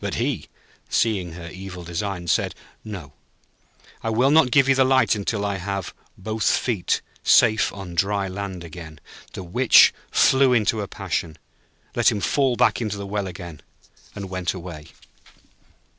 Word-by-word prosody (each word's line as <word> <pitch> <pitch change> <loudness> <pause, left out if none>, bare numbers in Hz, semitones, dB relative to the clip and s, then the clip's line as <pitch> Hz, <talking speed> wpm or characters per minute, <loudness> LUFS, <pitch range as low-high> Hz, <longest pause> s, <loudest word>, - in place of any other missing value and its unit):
But - - -3
he, - - -2 0.4
seeing 95 -7 0
her 85 0 -9
evil 90 0 -8
designs, 85 0 -3
said: - - 0 0.3
'No; 95 -10 -8 0.9
I 115 - -2
will 125 +5 +3
not 155 -4 +5
give 135 +1 +4
you 135 - +5
the 135 0 +4
light 130 0 +3 0.2
till 105 -2 -1
I 100 -1 -1
have 100 0 -4 0.2
both 110 +2 -4
feet 110 -8 +1 0.2
safe 110 0 +4
on 95 -3 -8
dry 100 +3 0
land 95 -1 -6
again.' 80 -1 -10 0.3
The - - -6
Witch 120 +9 +5 0.2
flew 130 -1 +4
into 110 -2 +1
a 100 - -4
passion, 85 -5 -4 0.6
let - - +3
him 105 - -2
fall 125 - +1
back 125 0 +2
into 105 -3 -3
the 100 - -6
well 100 0 -3
again, 85 -4 -9 0.5
and 100 -1 -6
went 90 -1 -3
away. 85 -4 -9
100 Hz, 160 wpm, -23 LUFS, 90-110 Hz, 0.9 s, not